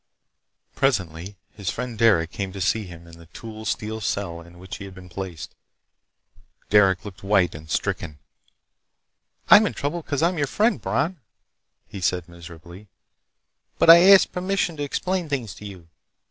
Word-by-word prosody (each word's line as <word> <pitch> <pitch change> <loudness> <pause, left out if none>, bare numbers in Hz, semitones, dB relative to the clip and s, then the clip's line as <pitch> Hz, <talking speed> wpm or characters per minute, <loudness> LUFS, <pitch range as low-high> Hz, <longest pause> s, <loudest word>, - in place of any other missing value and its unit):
Presently 95 - -1 0.2
his 100 -4 -4
friend 125 +4 -4
Derec 100 -7 +3
came 100 -2 -4
to 100 - -7
see 100 +3 0
him 85 -2 -12
in 85 0 -15
the 85 - -15
tool 110 +5 -10
steel 110 +1 -3
cell 95 -4 -3
in 85 +1 -16
which 95 +1 -8
he 100 - -9
had 95 -1 -11
been 90 -1 -13
placed. 90 -5 -7 1.2
Derec 95 -1 +4
looked 100 -2 -10
white 95 -3 +2
and 75 +1 -11
stricken. 75 0 -3 1.3
"I'm 215 0 +8
in - - -5
trouble 160 +5 -3
because 145 -1 -2
I'm 170 0 +1
your 145 - 0
friend, 210 - +1
Bron," 145 - -1 0.7
he 100 - -9
said 90 0 -1
miserably, 85 +3 -13 0.9
"but 165 - +8
I 170 - +10
asked 195 - +6
permission 180 -2 -1
to 145 - -3
explain 180 +4 -2
things 125 -9 -3
to 105 - -10
you. 90 -4 -12
100 Hz, 160 wpm, -23 LUFS, 85-135 Hz, 1.3 s, I